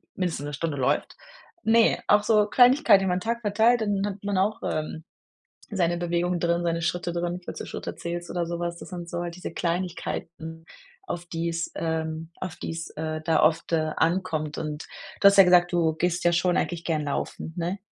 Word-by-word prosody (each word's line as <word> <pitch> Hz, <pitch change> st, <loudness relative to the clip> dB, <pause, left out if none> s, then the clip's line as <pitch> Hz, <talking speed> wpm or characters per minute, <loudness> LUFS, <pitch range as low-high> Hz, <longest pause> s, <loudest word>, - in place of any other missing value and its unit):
mindestens 175 Hz, -6 st, -2 dB
'ne 145 Hz, -, -5 dB
Stunde 150 Hz, 0 st, -2 dB
läuft. 130 Hz, -2 st, 0 dB, 0.5 s
Ne, 225 Hz, +1 st, +4 dB
auch 205 Hz, 0 st, +5 dB
so 210 Hz, -1 st, +4 dB
Kleinigkeiten, 245 Hz, -4 st, +6 dB
über 180 Hz, -, +1 dB
'n 180 Hz, -, 0 dB
Tag 235 Hz, +2 st, -2 dB
verteilt, 225 Hz, +3 st, +3 dB
dann 205 Hz, -2 st, 0 dB
hat 205 Hz, -1 st, -5 dB
man 200 Hz, -1 st, -1 dB
auch, 200 Hz, +3 st, +1 dB
ähm, 155 Hz, +1 st, -3 dB, 0.7 s
seine 175 Hz, -4 st, +1 dB
Bewegungen 175 Hz, +1 st, 0 dB
drin, 170 Hz, 0 st, +1 dB
seine 170 Hz, -1 st, -1 dB
Schritte 175 Hz, 0 st, -1 dB
drin, 175 Hz, +1 st, -2 dB
falls -, -, -7 dB
du -, -, -5 dB
Schritte -, -, -6 dB
zählst 175 Hz, 0 st, -5 dB
oder 175 Hz, -1 st, -1 dB
so 170 Hz, 0 st, -4 dB
was. 170 Hz, 0 st, -3 dB
Das -, -, -10 dB
sind 175 Hz, -2 st, -7 dB
so 175 Hz, 0 st, -3 dB
halt 170 Hz, -1 st, -5 dB
diese 180 Hz, -, -6 dB
Kleinigkeiten, 165 Hz, -2 st, -4 dB, 0.4 s
auf 175 Hz, -, -4 dB
die 170 Hz, 0 st, -3 dB
es, 165 Hz, 0 st, -3 dB
ähm 160 Hz, 0 st, -3 dB
auf 180 Hz, -2 st, -5 dB
die -, -, -5 dB
es, 165 Hz, 0 st, -6 dB
äh, 155 Hz, 0 st, -4 dB
da 165 Hz, 0 st, +3 dB
oft, 160 Hz, +2 st, +2 dB
äh, 155 Hz, -1 st, +1 dB
ankommt. 160 Hz, -3 st, 0 dB
Und 150 Hz, 0 st, -4 dB, 0.4 s
du -, -, +5 dB
hast 200 Hz, -, +3 dB
ja -, -, +12 dB
gesagt: 180 Hz, 0 st, +5 dB
„Du 165 Hz, -2 st, +2 dB
gehst 175 Hz, +2 st, 0 dB
ja 175 Hz, -, +4 dB
schon 175 Hz, +1 st, +2 dB
eigentlich 170 Hz, -1 st, -2 dB
gerne 155 Hz, -3 st, 0 dB
laufen“, 155 Hz, +2 st, -4 dB
ne? 175 Hz, +3 st, -2 dB
175 Hz, 205 wpm, -26 LUFS, 165-185 Hz, 0.7 s, ja